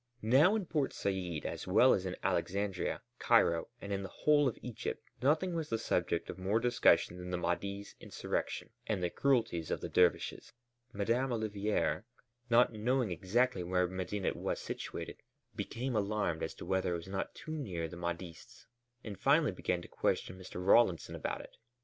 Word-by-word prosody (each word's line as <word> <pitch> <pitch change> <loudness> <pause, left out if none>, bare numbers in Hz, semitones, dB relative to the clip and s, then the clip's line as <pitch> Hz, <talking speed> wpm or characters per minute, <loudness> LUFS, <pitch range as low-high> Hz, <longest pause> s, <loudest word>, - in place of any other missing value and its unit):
Now 140 - +5
in 210 -4 -1
Port 150 -5 0
Said 90 -5 -2
as - - -4
well - - +6
as - - 0
in - - -3
Alexandria, 100 -1 -1 0.2
Cairo, 85 -1 +4
and 100 0 -5
in 100 - -1
the 95 - -6
whole 145 +4 +3
of 120 - -2
Egypt 120 -3 -4 0.2
nothing 155 +7 +2
was 165 -2 -2
the 115 - +1
subject 85 -6 0
of 95 - -7
more 100 +4 +1
discussion 120 -6 +3
than 90 0 -7
the 90 - -1
Mahdi's 100 +4 -2
insurrection - - -3 0.2
and 100 -4 -1
the 85 - 0
cruelties 115 - +1
of - - -1
the - - -5
dervishes. 90 -1 +2 0.4
Madame 120 +5 0
Olivier, 105 -6 0 0.5
not 120 0 +5
knowing 120 0 +1
exactly 100 +5 +1
where 90 +1 +1
Medinet 95 +2 -2
was - - -2
situated, - - -6 0.3
became 115 +4 -3
alarmed 100 -6 0
as 80 - -3
to - - -9
whether 95 -1 0
it - - -1
was 85 - -9
not 95 0 -3
too 155 - -8
near 90 - -3
the 80 - -9
Mahdists, 85 0 -6 0.4
and 105 -3 -7
finally 145 -1 +4
began 90 -1 -2
to - - -10
question - - -1
Mr. 90 0 -7
Rawlinson 100 -4 +4
about - - -3
it. - - -15
100 Hz, 175 wpm, -33 LUFS, 90-120 Hz, 0.5 s, well